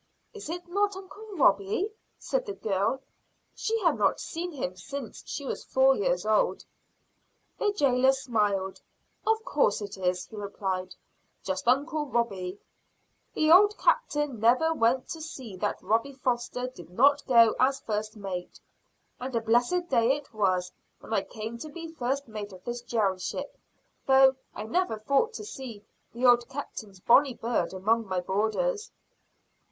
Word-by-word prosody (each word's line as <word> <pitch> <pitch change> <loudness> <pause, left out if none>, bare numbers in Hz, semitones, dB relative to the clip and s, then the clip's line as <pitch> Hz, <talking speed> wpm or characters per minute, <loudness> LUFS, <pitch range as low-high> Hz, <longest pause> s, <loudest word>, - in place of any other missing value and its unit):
"Is 415 -8 -8
it 350 +1 -5
not 405 +2 +1
uncle 390 +3 -10
Robie?" 265 - +2 0.3
said - - -2
the 405 - -3
girl. 215 +6 -1 0.5
She 450 +1 -1
had 330 - +2
not 200 -2 +2
seen 350 +2 -4
him 235 - -4
since 260 +7 -7
she 285 - -5
was - - -4
four 265 0 +4
years 180 -3 0
old. 215 -1 +1 0.9
The 415 - +2
jailer 265 -6 +4
smiled. 210 -7 -1 0.5
"Of 445 0 +2
course 240 -8 +2
it 200 -2 -7
is," 180 -1 0
he - - -13
replied, 190 -2 -3 0.5
"just 190 +3 -3
uncle 295 +4 +2
Robie. 200 -7 -2 0.8
The 310 0 +3
old 410 +4 +7
captain 295 - +1
never 255 +9 +4
went 250 -2 +2
to 325 - -5
sea 260 - -8
that 205 +2 -1
Robie 230 +6 +1
Foster 250 -1 -2
did 250 -10 -11
not 280 +10 +4
go 230 -4 +6
as 270 +1 +3
first 215 0 -3
mate. 185 -3 -6 0.6
And 255 0 -5
a - - +3
blessed 240 +11 +2
day 235 -2 +3
it 290 -4 -10
was 185 -4 +1 0.3
when - - -7
I - - +3
came 225 +1 -7
to 310 - -7
be 330 +2 -8
first 275 -1 -2
mate 210 -2 -6
of 185 -1 -13
this 240 0 -4
jail 210 -6 0
ship; - - -5 0.5
though 265 0 +6 0.2
I 210 - -5
never 225 +1 0
thought 280 - +1
to 425 - -6
see 235 - -8 0.3
the 240 +4 -2
old 240 -1 +5
captain's 215 -8 -7
bonnie 260 +6 +5
bird 235 +1 -1
among 220 +4 +1
my 185 -1 -1
boarders." 220 - -1
240 Hz, 160 wpm, -28 LUFS, 205-295 Hz, 0.9 s, old